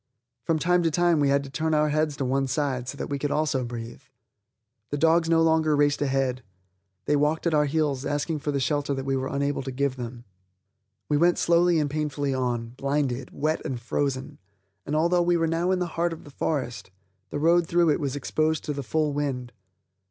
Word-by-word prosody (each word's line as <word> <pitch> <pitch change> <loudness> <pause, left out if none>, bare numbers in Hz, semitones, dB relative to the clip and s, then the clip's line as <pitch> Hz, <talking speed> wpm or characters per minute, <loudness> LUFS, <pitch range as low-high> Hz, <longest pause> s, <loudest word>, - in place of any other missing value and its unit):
From 160 +6 0
time 180 +3 +2
to 165 - +2
time 175 0 +2
we 140 -1 +3
had 140 0 +2
to 135 - -10
turn 160 +2 0
our 150 0 +3
heads 150 -1 0
to 135 - -1
one 135 +1 +1
side, 130 -3 -1
so 140 - -6
that - - -3
we 140 - -1
also 150 -2 +1
could 125 - -3
breathe. 115 +1 -7 0.9
The 145 - -2
dogs 165 +2 +3
no 165 -1 +4
longer 160 -1 +3
raced 145 0 +2
ahead; 135 -2 0 0.6
they 150 - +2
walked 150 +3 +1
at 170 - +2
our 150 -1 +4
heels 145 -3 0
asking 145 +2 -1
for 145 +1 -2
the 140 - -1
shelter 145 +1 0
that 135 0 -4
we 135 0 0
were 130 0 -2
unable 140 +1 -1
to 135 0 -5
give 135 0 -1
them. 120 -1 -7 0.8
We 150 - +2
went 175 +3 +3
slowly 170 0 +3
and 150 -2 +1
painfully 145 -1 -2
on, 120 -3 -1
blinded, 135 0 -2
wet 155 +1 -1
and 130 -6 -3
frozen, 130 +2 -2 0.5
and, 150 - -1
although 170 +3 +3
we 175 0 +2
were 165 - +1
now 165 +2 0
in 190 - +2
the 180 - -1
heart 170 0 -1
of 160 - -10
the 145 - -13
forest, 135 -7 -3 0.4
the - - -4
road 170 +3 +3
through 170 -2 +3
it - - +1
was 140 -3 -2
exposed 155 +3 0
to 150 - -3
the 140 - -4
full 150 +2 0
wind. 135 -4 -2
145 Hz, 215 wpm, -26 LUFS, 135-160 Hz, 0.9 s, no